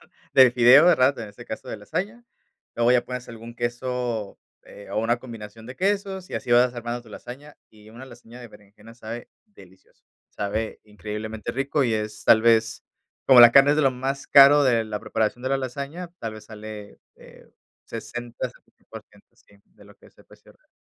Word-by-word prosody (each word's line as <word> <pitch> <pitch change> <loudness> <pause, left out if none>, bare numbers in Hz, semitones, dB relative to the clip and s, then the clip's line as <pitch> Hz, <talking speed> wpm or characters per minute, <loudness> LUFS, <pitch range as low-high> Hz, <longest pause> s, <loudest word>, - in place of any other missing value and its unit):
¿verdad? - - -24 0.2
De 130 -2 +7
fideos, 125 +6 +6
¿verdad? 135 -5 +4
En 110 - -7
este 120 +4 -13
caso 110 - -8
de - - -5
lasaña. 205 - -5 0.5
Luego 120 +1 +2
ya 125 -1 +2
pones 125 -1 -7
algún 115 0 -11
queso, 120 -3 -4 0.3
eh, 100 - -14
o - - -2
una 115 +2 0
combinación 115 -3 -11
de 125 +2 -10
quesos, 195 -1 -2
y - - -7
así - - -5
vas 125 +1 +4
armando 120 0 -5
tu 115 - -18
lasaña, 135 +7 -11
y 110 0 -18
una 120 +3 -11
lasaña 120 0 -14
de 120 - -11
berenjena 105 +2 -18
sabe 115 0 -9 0.2
delicioso. 95 - -21 0.2
Sabe 105 +2 -4
increíblemente 105 +1 -7
rico 135 +2 -1
y 115 - 0
es 105 -1 -5
tal 110 - +5
vez, 115 -1 +2 0.4
como 130 -2 +7
la 120 0 +9
carne, 140 +2 +6
es 150 - +2
de 155 - +2
lo 135 -2 +3
más 135 +2 -4
caro 140 +1 +7
de 120 -3 +2
la 105 -1 -5
preparación 110 +2 -2
de 130 - -1
la 135 - +1
lasaña, 140 +7 -6
tal 115 -1 -6
vez 110 - -13
sale, 105 -1 -10 0.2
eh, - - -18 0.4
60, 120 +2 -7
70%, - - -17
sí, 100 - -25
de 100 - -22
lo 100 - -18
que - - -21
es - - -25
el - - -20
precio - - -20
real. - - -36
120 Hz, 195 wpm, -23 LUFS, 110-130 Hz, 0.5 s, la